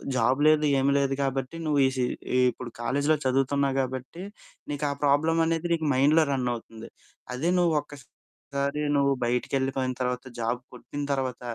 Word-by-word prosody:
Job 130 +3 +2
లేదు, 155 0 +4
ఏం 135 - +1
లేదు 135 -1 +1
కాబట్టి 135 +2 -2
నువ్వు 150 -2 +2
ఈ - - +2
సీ 125 - +1 0.3
ఈ - - +4
ఇప్పుడు 125 0 -8
కాలేజీలో 145 +6 +1
చదువుతున్నావు 135 +1 +1
కాబట్టి, 130 +7 -5 0.5
నీకు 145 +1 -2
ఆ - - -1
ప్రాబ్లమ్ 160 +4 +3
అనేది 165 +1 -1
నీకు 160 -2 -1
మైండ్‌లో 150 +4 +5
రన్ 125 -2 0
అవుతుంది. 115 0 -10 0.5
అదే 160 +7 0
నువ్వు 170 -2 +3
ఒక్కసారి 140 +1 -6
నువ్వు 140 0 +3
బయటికెళ్ళిపోయిన 130 +1 -1
తర్వాత 125 +1 -1 0.2
జాబ్ 115 +2 -1
కొట్టిన 145 +3 -6
తర్వాత, 130 -3 -3
135 Hz, 155 wpm, -26 LUFS, 130-150 Hz, 0.5 s, మైండ్‌లో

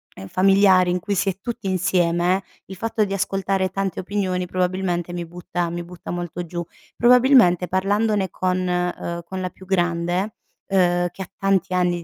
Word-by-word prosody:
ehm, 95 - -9
familiari, 190 - +4
in 180 - 0
cui 200 +3 -2
si 195 - 0
è 190 - -4
tutti 235 -3 -5
insieme, 180 0 +1 0.2
il 190 - -8
fatto 225 +1 0
di 195 -1 -2
ascoltare 195 0 0
tante 195 -2 -3
opinioni 185 -2 -1
probabilmente 180 -1 -1
mi 175 -1 -4
butta 175 0 -4
mi 175 +1 -4
butta 175 0 -11
molto 175 0 -4
giù. 175 +1 -4 0.3
Probabilmente 240 -8 +5
parlandone 200 +1 +1
con, 185 +1 -1
uhm, 180 -1 -2
con 190 +1 -5
la 185 - -2
più 190 - -16
grande, 175 +2 0 0.3
uhm, 175 -2 +2
che - - -10
ha 180 - -13
tanti 195 -2 +1
anni 175 -1 +1
185 Hz, 170 wpm, -22 LUFS, 175-195 Hz, 0.3 s, Probabilmente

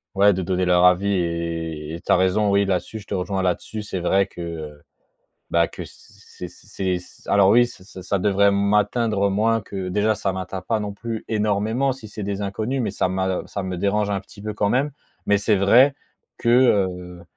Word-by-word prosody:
Ouais, 100 +1 +5
de 95 - -2
donner 90 +1 0
leur 90 0 +4
avis 90 +2 +4
et 85 -3 -3
et 85 - -7
tu - - -2
as - - +7
raison. 95 +3 +2
Oui, 100 0 +3
là-dessus, 95 +3 -2
je 105 - -13
te - - -5
rejoins 95 0 -2
là-dessus. 100 +4 -2
C'est 95 -3 -4
vrai 95 +3 +2
que, 95 - -11
heu, 80 -3 -7 0.7
bah, 85 0 +3
que - - -10
c'est 90 - -12
c'est 95 -1 -4 0.3
alors, 100 -1 +4
oui, 120 +3 +6
ça 95 -5 -12
ça 95 +2 -1
devrait 100 +1 +3
m'atteindre 105 +1 +1
moins 115 +3 +2
que 95 -1 -6
déjà 105 +3 +1
ça 100 -3 -2
m'atteint 95 0 -5
pas, 110 +4 -1
non 105 -1 -4
plus, 115 +1 -6
énormément 110 +5 0
si 125 -4 -11
c'est 105 +1 -8
des 100 0 -3
inconnus. 110 +6 -2
Mais 115 - -2
ça - - 0
m'a 95 0 -1
ça 100 - -4
me 95 -1 -4
dérange 100 +2 0
un 100 - 0
petit 100 +1 -15
peu 105 0 -4
quand 105 -1 0
même. 135 +6 +1 0.3
Mais 105 0 +3
c'est 105 +1 +2
vrai 120 +8 +5 0.4
que, - - -5
heu, 95 -8 +2
100 Hz, 205 wpm, -22 LUFS, 90-105 Hz, 0.7 s, as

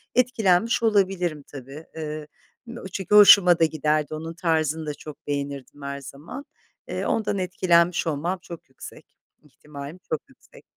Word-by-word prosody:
etkilenmiş 230 -3 +2
olabilirim, 185 -8 +1
tabii. 140 +3 -10
Iıı, 155 -1 -5 0.4
m 235 0 -9
çünkü 195 +1 0
hoşuma 195 -4 +8
da 165 - +5
giderdi, 155 -1 0
onun 160 +2 -6
tarzını 160 -2 0
da 150 - -3
çok 150 0 -12
beğenirdim 140 0 -5
her 140 0 -5
zaman. 145 - -9 0.4
Eee, - - -3
ondan 210 -2 0
etkilenmiş 175 -2 +2
olmam 165 +5 -2
çok 170 -6 -11
yüksek 130 - -12 0.4
ihtimalim 150 +3 -11
çok 155 - -1
yüksek. 270 - -19
160 Hz, 140 wpm, -24 LUFS, 150-190 Hz, 0.4 s, hoşuma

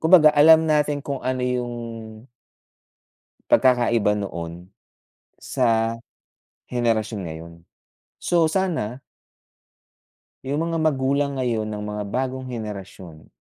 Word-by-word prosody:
kumbaga 160 -2 +7
alam 160 +2 +7
natin 150 -1 +1
kung 140 -1 -4
ano 130 0 -2
yung 125 0 0 1.9
pagkakaiba 120 -4 +3
noon, 85 -2 -6 0.7
sa 115 -2 +1 0.7
henerasyon 115 -3 -1
ngayon. 80 +1 -8 0.7
So 165 -2 +2
sana 160 - -1 1.5
yung 150 +5 -1
mga 165 - -1
magulang 140 -2 0
ngayon 115 -4 -1
ng 105 -1 -5
mga 105 0 -4
bagong 130 0 -2
henerasyon 100 -8 -8
125 Hz, 95 wpm, -23 LUFS, 105-145 Hz, 1.9 s, kumbaga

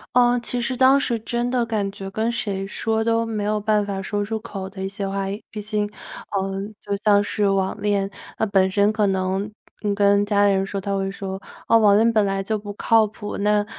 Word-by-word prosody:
呃， 245 0 +5
其 245 0 -1
实 255 +1 -2
当 265 +2 +6
时 240 -4 0
真 240 +2 -2
的 245 -2 +1
感 210 -3 -1
觉， 195 -1 -8
跟 220 +3 0
谁 195 -4 -3
说 220 +2 -1
都 230 0 +1
没 215 -2 -3
有 210 0 0
办 210 0 +2
法 200 -1 -3
说 205 +1 -2
出 220 +1 -3
口 195 -4 -6
的 190 0 -7
一 190 - -1
些 195 0 -4
话 195 0 -2
也 200 +3 -5
毕 215 - -7
竟 210 0 -2 0.4
呃， 195 0 -2 0.2
就 200 -1 -3
像 205 -1 +5
是 205 -1 +1
网 195 +1 0
恋， 200 -1 0 0.3
那 220 - +1
本 190 -2 +3
身 205 +2 +2
可 210 -2 +2
能 190 +1 -1 0.4
跟 200 0 +4
家 205 -1 +3
里 200 - +4
人 190 - +1
说， 195 0 -4
他 200 0 -2
会 195 0 -1
说，： 190 -1 -5 0.3
“网 215 -3 +5
恋 230 +1 +3
本 215 -2 +3
来 195 0 -1
就 215 +2 -1
不 205 0 -7
靠 225 +1 +4
谱， 210 0 -7
那， 210 0 +2
205 Hz, 240 characters per minute, -22 LUFS, 195-220 Hz, 0.4 s, 当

